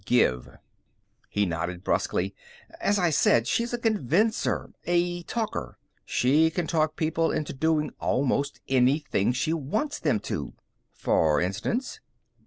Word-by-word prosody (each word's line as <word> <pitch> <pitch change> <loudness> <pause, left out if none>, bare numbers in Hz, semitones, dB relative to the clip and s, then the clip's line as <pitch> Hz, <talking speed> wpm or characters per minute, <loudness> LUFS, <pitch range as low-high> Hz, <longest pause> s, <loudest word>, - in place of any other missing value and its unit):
Give." 65 - +1 0.7
He 105 0 +1
nodded 90 +1 -3
brusquely. 95 0 0 0.5
"As 205 - +2
I 175 -3 +2
said, 115 -5 +4
she's 235 - 0
a 240 - -1
convincer. 215 - +1
A 175 0 +1
talker. 210 - -4 0.3
She 150 +6 +3
can 170 +1 -2
talk 155 -2 0
people 160 +1 0
into 150 - -2
doing 155 +2 +1
almost 140 +2 0
anything 130 -3 +2
she 130 +6 0
wants 210 - -2
them 135 -9 +1
to." - - -4 0.4
"For 75 -2 +2
instance?" 100 - -2
150 Hz, 125 wpm, -26 LUFS, 120-175 Hz, 0.7 s, said